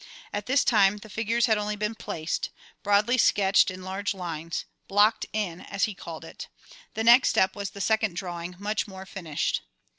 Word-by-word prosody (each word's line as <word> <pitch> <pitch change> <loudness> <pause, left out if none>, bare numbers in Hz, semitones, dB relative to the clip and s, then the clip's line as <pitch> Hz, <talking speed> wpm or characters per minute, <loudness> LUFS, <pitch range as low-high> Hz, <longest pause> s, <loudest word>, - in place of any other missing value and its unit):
At 205 +1 -3
this 260 +1 +3
time 210 -3 +4
the 210 0 -12
figures 230 +3 +1
had 220 -3 +2
only 210 0 -2
been 210 +1 -2
"placed," 160 -7 -3 0.3
broadly 210 +5 +3
sketched 200 -2 +4
in 185 0 -7
large 195 +2 -3
lines, 165 -3 -4 0.2
"blocked 210 +3 +3
in" 190 -5 -3
as 195 - -4
he 215 - +1
called - - -9
it. - - -9 0.5
The 220 - -1
next 240 +3 +7
step 190 - +2
was 200 -1 -4
the 200 - -8
second 220 -3 +1
drawing, 175 -1 -5
much 210 +3 -2
more 190 -1 -9
finished. 170 -6 -2
205 Hz, 180 wpm, -27 LUFS, 185-215 Hz, 0.5 s, next